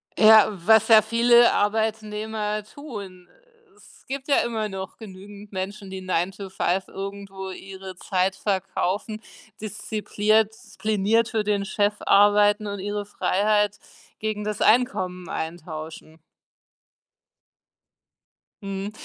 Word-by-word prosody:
Ja, 215 -1 +8
was 205 +3 +3
ja 220 -2 +8
viele 235 +2 +5
Arbeitnehmer 215 0 -1
tun, 205 -8 -10 0.5
es 420 - -20
gibt 275 0 -5
ja 280 - +4
immer 225 -2 0
noch 190 -1 -7
genügend 205 0 -12
Menschen, 195 +1 -5
die 190 0 -6
Nine-to-Five 185 +1 -2
irgendwo 195 -1 -7
ihre 190 0 -9
Zeit 185 +1 0
verkaufen, 200 +2 -2 0.4
diszipliert 215 0 0 0.2
pliniert 215 +3 +2
für 220 -3 -1
den 205 -1 0
Chef 205 0 +1
arbeiten 205 +1 +4
und 200 -1 -5
ihre 205 +1 -3
Freiheit 205 +1 +1 0.4
gegen 215 -1 -3
das 210 -1 -4
Einkommen 190 -7 +1
eintauschen. 160 -1 -7 2.4
Mhm. 195 +1 -4
205 Hz, 105 wpm, -24 LUFS, 190-215 Hz, 2.4 s, Ja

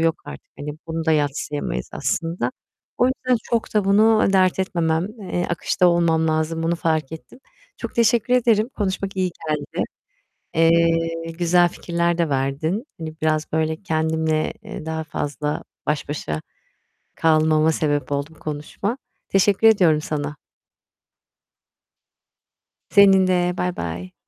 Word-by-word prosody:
yok 165 -1 +1
artık, 70 -1 -10
hani, 150 +1 -5 0.2
bunu 165 0 -3
da 160 - +4
yadsıyamayız 145 0 -2
aslında. 165 - -1 0.5
O 245 - +4
yüzden 255 -1 +1
çok 230 -2 -2
da 210 -2 +3
bunu 215 +3 +4
dert 185 -1 +3
etmemem, 170 -2 0 0.2
eee, 175 -1 -2
akışta 175 +2 +1
olmam 165 -2 +2
lazım, 160 +1 0
bunu 170 +1 0
fark 160 -3 -1
ettim. 160 +9 -10 0.4
Çok - - -6
teşekkür 235 +1 +3
ederim, 230 -2 +3
konuşmak 195 -1 -2
iyi 185 -1 +1 0.2
geldi. 150 -2 -2 0.7
Eee, 165 0 +2
güzel 175 0 +4
fikirler 170 0 -1
de 170 -2 +1
verdin, 140 - -1 0.2
hani, 160 -1 -6
biraz 155 0 0
böyle 160 +2 -1
kendimle, 160 -2 0
eee, 210 -7 -8
daha 160 0 -3
fazla 150 -1 -3 0.2
baş 150 -1 -1
başa 80 - -3 0.7
kalmama 155 0 +3
sebep 145 -2 -1
oldu 140 +1 -1
bu - - -21
konuşma. 155 - -4 0.3
Teşekkür 195 +3 +4
ediyorum 175 -8 +4
sana. 150 -1 -3 2.6
Senin 195 -2 +6
de. 180 -1 +2
Baybay. 90 - -4
165 Hz, 130 wpm, -22 LUFS, 155-185 Hz, 2.6 s, Senin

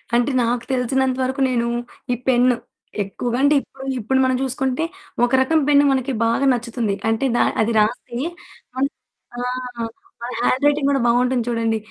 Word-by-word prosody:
అంటే 245 +4 +2
నాకు 235 0 0
తెలిసినంత 260 +1 +1
వరకు 265 +1 -2
నేను 235 -2 0 0.5
ఈ - - +1
పెన్ను. 250 -1 +4 0.5
ఎక్కువగా 235 +5 -3
అంటే 290 +1 +5
ఇప్పుడు 265 0 -12
ఇప్పుడు 260 +4 +1
మనం 260 0 +2
చూసుకుంటే, 265 +2 -1 0.4
ఒక 245 - -4
రకం 315 +5 +3
పెన్ను 290 -1 +5
మనకి 265 0 0
బాగా 230 +4 +1
నచ్చుతుంది. 235 -3 -2
అంటే 225 +4 0
దా - - +4 0.2
అది 220 +1 +1
రాసి. 235 +3 -1 0.6
మనం 270 +2 +1 0.5
ఆ! - - -4 0.9
అది 250 - -5
హ్యాండ్ 255 +3 +1
రైటింగ్ 290 -1 +3
కూడా 275 - +2
బావుంటుంది 245 +1 +2
చూడండి. 230 -1 0
250 Hz, 155 wpm, -21 LUFS, 235-265 Hz, 0.9 s, అంటే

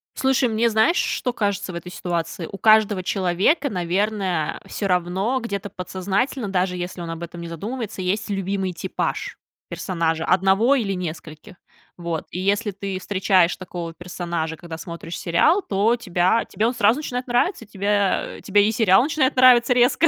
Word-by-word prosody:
Слушай, 265 -2 +2
мне 225 +2 +2
знаешь, 220 +9 +3
что 250 - 0
кажется 205 -4 -2
в - - -7
этой 170 +1 -7
ситуации? 170 -1 -3
У 195 - -7
каждого 215 -2 +4
человека, 195 - +1
наверное, 185 -3 -1
всё 200 - -3
равно 185 +7 0
где-то 200 -3 -4
подсознательно, 195 +7 -2
даже 180 -1 0
если 180 0 -5
он 170 - -6
об 165 - -7
этом 170 0 -8
не 170 - -6
задумывается, 210 +5 -5
есть 200 +5 -1
любимый 195 -1 -2
типаж - - -3 0.3
персонажа, 165 -3 -1
одного 195 +8 +3
или 210 -7 0
нескольких. 170 +1 -7 0.4
Вот. 170 -2 -4
И 180 - -4
если 205 +3 0
ты 195 -1 -5
встречаешь 185 -2 +2
такого 175 -3 -6
персонажа, 170 -2 -4
когда 165 -1 -8
смотришь 170 0 -7
сериал, 180 - +3
то 210 - +1
тебя 185 0 +1
тебе 215 - -1
он 245 - 0
сразу 220 +2 +3
начинает 250 -4 -4
нравиться, 245 - 0
тебе 200 -1 0
тебе 205 +1 +3
и - - +2
сериал 220 -2 +4
начинает 285 -2 +1
нравиться 250 -1 +6
резко 245 +7 +4
195 Hz, 160 wpm, -22 LUFS, 175-220 Hz, 0.4 s, нравиться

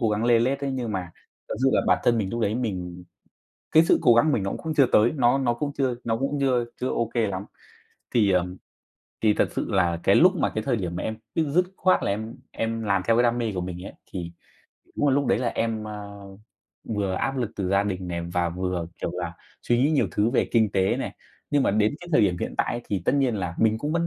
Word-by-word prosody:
cố 115 - +2
gắng 105 +2 0
lê 120 -1 +5
lết 135 +4 0
đấy, 140 - -1
nhưng 120 -4 -3
mà 90 -3 -4 0.4
thật - - -3
sự 135 - +4
là - - +4
bản - - +4
thân 120 -1 +3
mình 100 -3 -1
lúc 120 0 -3
đấy 105 -1 +1
mình 90 -7 -4 0.7
cái 160 +1 +7
sự - - +3
cố 120 - +6
gắng 120 - +5
của 155 - +2
mình 100 - 0
nó 95 - -2
cũng 160 -1 -4
chưa 140 -5 +4
tới, 110 +3 +5
nó 125 0 +3
nó 125 -3 +1
cũng 140 +4 -3
chưa 130 -3 +1
nó 115 -1 0
cũng 140 +3 -1
chưa 125 -3 +2 0.2
chưa 130 - 0
ô 115 -1 -1
kê 115 -3 +1
lắm. 95 +1 -4 0.7
Thì, 105 -5 +4
ờ, 90 -1 +2 0.8
thì 105 -1 +5
thật - - +2
sự - - -2
là 85 -3 +1
cái 100 - +4
lúc 185 +2 +6
mà - - +1
cái 110 - -1
thời 125 - +1
điểm 90 -5 -3
mà - - -3
em 110 0 -3 0.2
dứt 160 +3 +2
khoát 185 0 +3
là - - +1
em 110 +3 -4 0.2
em 115 0 -3
làm 100 -2 +1
theo 115 - +4
cái 120 - +4
đam 120 0 +2
mê 115 -3 -1
của 90 - -1
mình 90 0 -6
ấy, - - -8 0.2
thì 85 -2 -5 0.7
đúng 145 - +2
là 130 - +3
lúc 140 -1 +1
đấy - - +2
là 125 -2 0
em, 110 -1 -2
ờ, 100 -1 -8 0.7
vừa 100 -2 -1
áp 135 +8 -1
lực 120 -5 -2
từ 95 -3 -2
gia 100 +1 +3
đình 95 -3 -3
này 85 -1 -3
và 90 -1 +1
vừa, 90 -1 -3
kiểu - - -2
là, 90 -1 -4 0.3
suy 120 0 +1
nghĩ 145 - +3
nhiều 135 - +2
thứ 105 +7 +1
về 130 - +1
kinh 110 -3 +3
tế 95 -1 +2
này. - - -5 0.3
Nhưng 145 -1 +3
mà - - +2
đến 105 +5 +2
cái 175 - -10
thời 150 - +5
điểm 95 -5 +2
hiện - - -3
tại - - +1
ấy 120 - -3
thì 95 -4 -3
tất - - +2
nhiên 135 -4 +2
là 90 -3 -3
mình 110 0 +3
cũng 150 +4 -2
vẫn 170 0 +1
110 Hz, 265 wpm, -25 LUFS, 95-130 Hz, 0.8 s, cái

